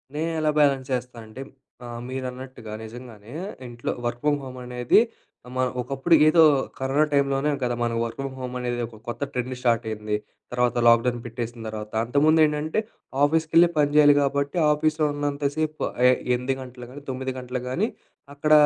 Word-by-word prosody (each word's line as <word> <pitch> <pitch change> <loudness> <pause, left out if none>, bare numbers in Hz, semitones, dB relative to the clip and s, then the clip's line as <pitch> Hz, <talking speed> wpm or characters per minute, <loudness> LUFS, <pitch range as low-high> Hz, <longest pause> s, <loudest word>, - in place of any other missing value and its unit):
నేనెలా 160 0 0
బ్యాలెన్స్ 135 -3 +3
చేస్తా 125 -1 -3
అంటే 110 +5 -10 0.4
ఆహ్, 120 -1 -6
మీరన్నట్టుగా 130 -3 -6
నిజంగానే 115 -1 -10 0.3
ఇంట్లో 120 0 -4
వర్క్ 120 0 -2
ఫ్రమ్ 145 -1 +2
హోమ్ 130 -1 -8
అనేది 125 - +3 0.6
మ - - -3 0.2
ఒకప్పుడు 135 +6 +2
ఏదో 165 +2 +6 0.4
కరోనా 135 +3 +2
టైంలోనే 140 0 +2
గదా! 120 -1 0
మన 120 0 +1
వర్క్ 115 0 -3
ఫ్రమ్ 135 -1 -4
హోమ్ 125 -1 -5
అనేది 120 -1 -2
ఒక 115 -1 -12
కొత్త 120 - -6
ట్రెండ్ 125 0 -2
స్టార్ట్ 120 -2 +1
అయింది. 105 -1 -2 0.4
తర్వాత 125 -1 +1
లాక్‌డౌన్ 120 +1 +4
పెట్టేసిన 120 0 -5
తర్వాత, 105 -1 -6
అంతకుముందు 145 +6 +3
ఏంటంటే, 150 +4 -1 0.4
ఆఫీస్‌కెళ్లే 160 +3 +4
పని 145 -1 +3
జేయాలి 145 -1 +8
కాబట్టి, 140 +2 0
ఆఫీస్‌‌లో 155 +1 +1
ఉన్నంత 145 0 -1
సేపు 155 -1 -2 0.2
ఆహ్, 125 - +5 0.2
8 125 +2 -1
గంటలకు 125 -1 -10
గానీ, 140 +2 -10
9 130 0 -3
గంటలకు 125 0 -5
గానీ 195 +11 +1 0.5
అక్కడ 150 +2 -1
130 Hz, 160 wpm, -25 LUFS, 120-145 Hz, 0.6 s, జేయాలి